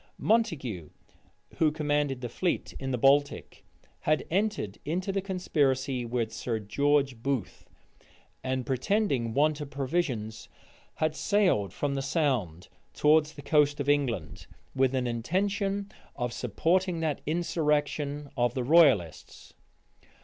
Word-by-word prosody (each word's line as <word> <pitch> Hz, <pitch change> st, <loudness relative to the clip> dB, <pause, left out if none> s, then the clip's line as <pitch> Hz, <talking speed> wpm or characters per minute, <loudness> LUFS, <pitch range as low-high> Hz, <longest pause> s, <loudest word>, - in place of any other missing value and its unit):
Montague, 135 Hz, -, 0 dB, 0.7 s
who 155 Hz, -2 st, +3 dB
commanded 145 Hz, -3 st, -1 dB
the 120 Hz, -, -3 dB
fleet 175 Hz, +9 st, -2 dB
in 135 Hz, -, -4 dB
the 125 Hz, -, 0 dB
Baltic, 140 Hz, +3 st, +2 dB, 0.4 s
had 155 Hz, 0 st, 0 dB
entered 190 Hz, -, -1 dB
into 180 Hz, +5 st, -2 dB
the 195 Hz, 0 st, -1 dB
conspiracy 140 Hz, -9 st, 0 dB
with 115 Hz, -2 st, -2 dB
Sir 115 Hz, -2 st, -2 dB
George 135 Hz, +3 st, +1 dB
Booth; 135 Hz, -6 st, -3 dB, 0.7 s
and 130 Hz, -1 st, -2 dB
pretending 135 Hz, -, 0 dB
want 150 Hz, +1 st, +2 dB
of 145 Hz, -, -6 dB
provisions, 130 Hz, -7 st, -2 dB, 0.5 s
had 155 Hz, 0 st, 0 dB
sailed 180 Hz, -, +2 dB
from 145 Hz, +7 st, -2 dB
the 135 Hz, -, -1 dB
Sound 130 Hz, -, -1 dB, 0.3 s
towards 155 Hz, +1 st, +3 dB
the 145 Hz, -, -11 dB
coast 145 Hz, 0 st, +3 dB
of 140 Hz, -, -2 dB
England, 120 Hz, -, -1 dB, 0.3 s
with 135 Hz, 0 st, +2 dB
an 130 Hz, -1 st, 0 dB
intention 195 Hz, -, -1 dB, 0.2 s
of 120 Hz, -3 st, -3 dB
supporting 170 Hz, -, 0 dB
that 155 Hz, -3 st, -1 dB
insurrection 150 Hz, -3 st, -1 dB
of 120 Hz, -2 st, +1 dB
the 130 Hz, -, -1 dB
royalists. 130 Hz, -, +2 dB
145 Hz, 125 wpm, -28 LUFS, 125-160 Hz, 0.7 s, who